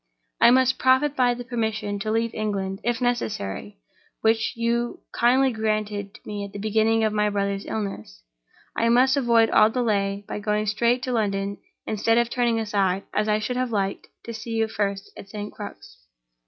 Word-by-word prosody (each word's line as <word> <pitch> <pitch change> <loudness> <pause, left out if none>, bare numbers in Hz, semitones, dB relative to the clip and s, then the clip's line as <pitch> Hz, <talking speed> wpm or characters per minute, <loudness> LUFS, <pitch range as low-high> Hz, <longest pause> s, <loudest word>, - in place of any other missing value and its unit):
I 235 - +7
must 260 +1 +3
profit 260 +3 +3
by 245 -2 +3
the 245 - -6
permission 220 -4 -2
to 215 - -3
leave 225 +1 0
England, 195 -3 -2
if 240 +1 -1
necessary, 155 - -2 0.4
which 225 0 +2
you 235 +1 -1
kindly 260 +3 +3
granted 215 -2 -2
to - - -14
me 205 -1 -4
at 200 0 -8
the - - -6
beginning 220 +2 +2
of 215 -1 +1
my 210 0 +2
brother's 200 -1 -2
illness, 105 - -5 0.5
and 230 - +1
I - - +3
must 255 +3 +4
avoid 235 -4 +3
all 215 0 +6
delay 205 -4 -1
by - - -4
going 210 0 0
straight 235 +4 +1
to 255 - -2
London, 200 -3 -1 0.3
instead 225 +2 +1
of 235 0 +2
turning 240 -3 +1
aside, 200 -3 0
as 210 0 0
I 210 - +3
should 230 +4 -3
have 255 -1 0
liked, 195 -2 -2 0.2
to 230 - -7
see 225 +1 -5
you 225 0 +1
first 200 -2 -3
at 195 - -11
St. 210 0 -6
Crux. - - -10
220 Hz, 185 wpm, -24 LUFS, 205-235 Hz, 0.5 s, I